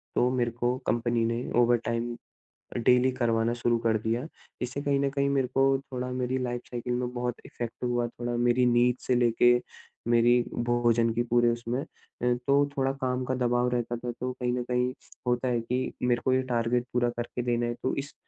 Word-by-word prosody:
तो 125 - +3
मेरे 120 -2 +1
को 120 +2 -1
कंपनी 120 -1 +1
ने 115 +2 -1 0.2
ओवरटाइम 120 0 +1 0.6
अ, - - 0
डेली 125 +2 +4
करवाना 115 -2 +1
शुरू 120 0 +1
कर 110 -1 +3
दिया। 115 +4 -2 0.4
इससे 130 +3 -3
कहीं 140 -1 +1
न 140 0 +1
कहीं 140 0 0
मेरे 135 -2 +1
को 135 +1 +3
थोड़ा 125 0 -3
मेरी 125 0 -1
लाइफ 120 -1 -3
साइकिल 120 0 -3
में 125 0 -2
बहुत 120 -1 -2
इफ़ेक्ट 120 -2 -5
हुआ, 120 -1 0
थोड़ा 120 0 -4
मेरी 125 +1 +3
नींद 120 0 +4
से 125 - +3
लेके 120 0 +4 0.5
मेरी 120 +1 +4 0.3
भोजन 120 -1 +3
की 120 - +1
पूरे 120 0 +3
उसमें। 120 +3 -2
अ, - - -10 0.6
तो 140 +1 +4
थोड़ा 135 0 +2
काम 130 0 0
का 130 - -1
दबाव 125 0 +1
रहता 120 -1 -1
था, 120 +1 -4
तो 125 +2 -4
कहीं 125 -1 -2
न 125 0 -1
कहीं 125 +1 0 0.3
होता 125 +1 +1
है 120 -2 +1
कि 125 +3 -2
मेरे 120 -1 +2
को 130 - +3
ये 130 - +3
टारगेट 120 +1 +1
पूरा 120 -1 +2
करके 120 +1 -3
देना 120 -1 0
है। 120 - -1
तो 130 - 0
इस 145 - -13
120 Hz, 200 wpm, -28 LUFS, 120-125 Hz, 0.6 s, डेली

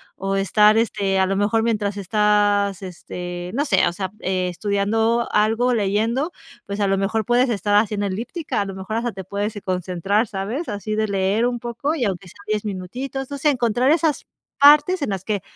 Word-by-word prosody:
O 195 0 -2
estar, 210 +3 +4
este, 195 -4 0
a 190 - +3
lo 195 - 0
mejor 205 +3 +1
mientras 210 -3 -1
estás 205 0 +1
este, 180 -1 -7
no 280 +5 +1
sé, 190 - +3
o 170 - -1
sea, 190 -1 -4
estudiando 200 +5 0
algo, 225 +4 +2
leyendo, 225 - 0 0.3
pues, 200 +1 -5
a 200 - +2
lo 195 0 +1
mejor 215 +3 0
puedes 245 +3 +2
estar 205 -1 0
haciendo 205 -1 +2
elíptica, 235 - -3
a - - -1
lo 195 - -6
mejor 190 +3 -5
hasta 240 0 -1
te 190 0 -8
puedes 205 +3 -3
y 205 - -6
concentrar, 185 +3 0
¿sabes? 210 - -4
así 210 +1 -3
de 215 0 0
leer 200 +3 +1
un 245 -1 -1
poco, 240 +6 -2
y 260 -8 -1
aunque 190 -1 -3
sea - - -18
10 215 0 -1
minutitos, 250 +8 -5
no 285 - -5
sé. 300 +2 +2
Encontrar 245 +1 +1
esas 315 -2 +1 0.3
partes 295 +5 +6
en 280 - -1
las 190 -2 -3
que 205 -2 -2
210 Hz, 195 wpm, -21 LUFS, 195-235 Hz, 0.3 s, partes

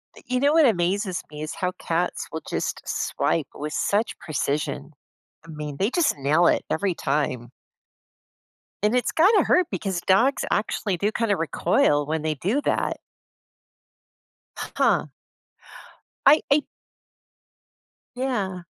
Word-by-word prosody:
Y - - -14
you 255 0 0
know 285 +3 +3
what 320 -1 +6
amazes 185 -3 +1
me 150 0 -8
is 155 - -4
how 180 0 -1
cats 170 +2 -2
will 160 - -5
just - - -3
swipe 160 -5 -1
with 150 +1 -5
such 210 +3 0
precision. 150 0 -2 0.5
I - - -14
mean, 150 -2 -6
they 200 +6 +1
just 320 - +1
nail 150 +5 +3
it - - +2
every 185 +1 0
time. 125 -7 -1 1.3
And 210 +3 +3
it's 250 - +1
gotta 385 +4 +5
hurt 360 -2 +3
because 190 -4 -2
dogs 235 +10 +3
actually 205 -2 -1
do 205 +5 0
kinda 220 -2 +1
recoil 145 -3 +1
when 155 +1 -2
they 155 0 -1
do 205 - 0
that. - - 0 1.8
Huh. - - +2 1.2
I 290 +3 +7
I 290 +1 +4 1.5
Yeah. 205 -9 -2
185 Hz, 130 wpm, -24 LUFS, 155-245 Hz, 1.8 s, I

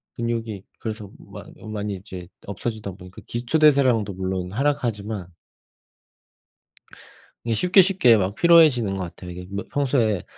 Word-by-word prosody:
근육이 115 -4 -3 0.2
그래서 110 -3 -6
많 - - -12 0.2
많이 105 -1 -3
이제 90 -2 -10 0.2
없어지다 105 0 -4
보니까 90 0 -13
기초 120 +6 -1
대사량도 130 -9 +4
물론 95 -1 -3
하락하지만 110 -7 -2 2.2
이게 115 -1 0
쉽게 180 - +5
쉽게 180 - +5
막 95 +1 -1
피로해지는 150 - +5
것 95 - -3
같아요. 90 +1 -9
이게 90 +1 -9
뭐 100 0 -4
평소에 125 - +1
110 Hz, 305 characters per minute, -23 LUFS, 95-125 Hz, 2.2 s, 쉽게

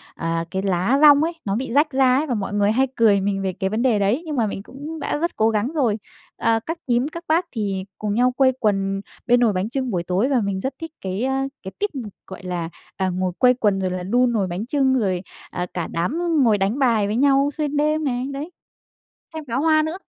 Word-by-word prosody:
à, 165 0 -2
cái 190 - -1
lá 195 +7 +1
dong 295 -1 +7
ấy 335 +2 -1
nó 195 -1 0
bị 245 +1 -3
rách 295 +2 +3
ra 260 -2 +4
ấy, 305 +3 0
và 255 - -1
mọi 205 -3 -3
người 205 0 +2
hay 260 +4 +2
cười 210 -4 +4
mình 195 0 -1
về 190 -1 -2
cái 190 +1 -2
vấn 215 +3 -1
đề 240 -5 +3
đấy, 205 +9 +1
nhưng 310 -2 -4
mà 230 -4 +1
mình 195 -1 -5
cũng 295 +7 -8
đã - - -2
rất 340 +3 -2
cố 220 +1 +3
gắng 215 0 0
rồi. 245 -9 +1 0.4
À, 225 0 +2
các 330 +1 -3
nhím, 245 +2 +2
các 335 +2 -8
bác 330 +3 +2
thì 200 -5 -3
cùng 210 -1 -2
nhau 250 +3 +3
quây 260 +1 +3
quần 195 -3 0 0.3
bên 245 0 +5
nồi 230 -4 +3
bánh 185 +3 -1
chưng 260 0 -2
buổi 175 -3 -1
tối. 185 +9 0
Và 260 -4 +2
mình 200 -2 -2
rất 265 +7 -3
thích 325 -1 -7
cái, 190 +4 -3
a, 265 +1 0 0.2
cái 190 - -6
tip, 415 - 0 0.4
gọi 190 0 -10
là, 175 -2 -3 0.3
à, 190 -1 0
ngồi 185 0 -1
quây 250 0 +6
quần 210 -6 +1
rồi 185 -1 -1
là 180 0 -3
đun 245 +6 +2
nồi 205 -5 0
bánh 180 +4 -4
chưng, 265 0 +2
rồi, 185 -5 0 0.3
à, 180 - -3
cả 175 -2 -3
đám 180 - -1 0.2
ngồi 220 -4 +4
đánh 200 +7 0
bài 230 -6 +3
với 210 - -1
nhau 275 +2 +3
xuyên 295 -2 -1
đêm 305 +1 +1
này, 250 -3 -1
đấy, 295 +5 -6 0.8
xem 315 -1 -5
pháo 240 +3 -1
hoa 310 0 +4
nữa. 315 +4 -3
230 Hz, 245 wpm, -22 LUFS, 195-275 Hz, 0.8 s, dong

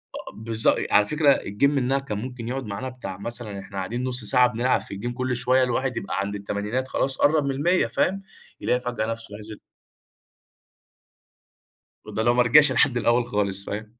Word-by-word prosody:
آه - - -8
بالضبط، 110 0 +1 0.2
على 105 - +5
فكرة 150 +1 +3
الgame 100 +7 -6
منها 135 -1 0
كان 110 -7 -5
ممكن 125 -1 -7
يقعُد 130 0 -4
معانا 105 +6 -5
بتاع، 100 -7 -8
مثلًا 110 -2 -4
إحنا 95 0 -10
قاعدين 115 +7 -3
نُص 125 -2 +3
ساعة 125 +3 +5
بنلعب 125 +2 0
في 100 - -9
الgame 120 +2 -4
كلّ 125 0 -2
شوية، 130 +1 +2
الواحد 125 0 -1
يبقى 100 - -3
عند 100 +1 -3
التمانينات 105 +6 -3
خلاص 135 0 0
قرب 150 0 +3
من 140 - 0
ال100 170 +7 +1
فاهم، 195 +1 0 0.4
يلاقي 125 - +1
فجأة 125 -3 -3
نفسه 115 -2 -3
نزِل. 110 0 -9 2.5
وده 110 - -3
لو 120 +1 +3
ما 125 - +3
رجَعش 145 +5 +6
لحد 125 -4 +2
الأول 120 0 +1
خالص، 100 -1 -1
فاهم. 110 +2 -6
120 Hz, 180 wpm, -24 LUFS, 105-130 Hz, 2.5 s, رجَعش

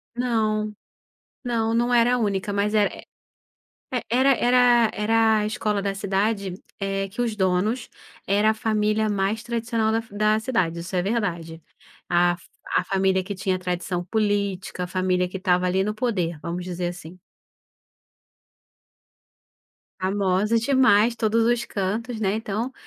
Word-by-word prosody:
Não, 215 -3 0 0.7
não, 230 -2 0
não 240 +1 +1
era 240 +1 +4
a - - 0
única 205 -3 -1
mas 200 +1 0
é, 205 -1 0 1.0
era 260 +3 +4
era 245 -2 +4
era 220 +1 +3
a 210 - -1
escola 210 -2 -1
da 195 0 -2
cidade, 200 0 -1 0.3
é 195 0 -2
que 230 +5 -4
os 230 -3 -1
donos 200 +5 0 0.4
era 205 +2 +3
a - - -1
família 215 0 0
mais 205 +2 0
tradicional 230 -2 -1
da 225 - +1
fa 225 -3 -15
da 215 +1 +2
cidade, 220 -9 -1
isso 175 +3 -6
é 180 - +2
verdade. 175 -6 -2 0.5
A 175 0 +3
fa 170 - -4
família 190 -2 +1
que 200 +2 -5
tinha 190 -1 -1
tradição 180 -1 -3
política, 200 -3 -1
a - - -4
família 185 0 0
que 190 - -6
estava 180 -1 +1
ali 185 +1 +1
no 210 +1 -2
poder, 185 -9 -1
vamos 175 +1 -4
dizer 180 -1 -3
assim. 175 0 -10 2.8
Famosa 195 +3 +1
demais, 235 -3 +4
todos 225 0 +1
os 240 0 +1
cantos, 220 +4 -3
né, 195 -2 +1
então, 220 +3 -3
210 Hz, 145 wpm, -24 LUFS, 185-225 Hz, 2.8 s, era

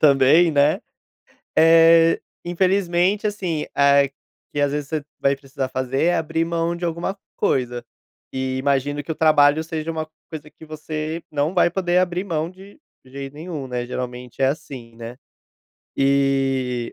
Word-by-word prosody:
também, 145 +4 +5
né, 145 0 +3 0.8
eh, 165 0 +6 0.2
infelizmente, 185 +2 +1
assim, 185 -7 -2
é 140 -1 +4 0.4
que 145 - -2
às 145 0 +1
vezes 145 -1 -3
você 155 -2 -3 0.2
vai 140 0 +3
precisar 135 -1 -5
fazer 130 0 -2
é 175 0 +3
abrir 165 0 -1
mão 170 0 -1
de 175 - -6
alguma 170 +4 -2 0.2
coisa, 125 -2 0 0.5
e 130 0 -2
imagino 140 +1 0
que 160 - -10
o - - 0
trabalho 155 -1 +4
seja 160 0 -4
uma 160 -1 -3 0.2
coisa 155 -1 -8
que 160 - -15
você 155 +1 -5
não 150 +4 -1
vai 175 - +4
poder 180 0 +1
abrir 180 +1 0
mão 165 -3 -2
de 190 +5 -15 0.3
jeito 135 +1 -8
nenhum, 150 -2 -6
né, 125 -1 -4
geralmente 125 0 -6
é - - +5
assim, 130 -5 -6
né. 115 +1 -9 0.8
E 135 -3 +1
150 Hz, 150 wpm, -22 LUFS, 135-165 Hz, 0.8 s, eh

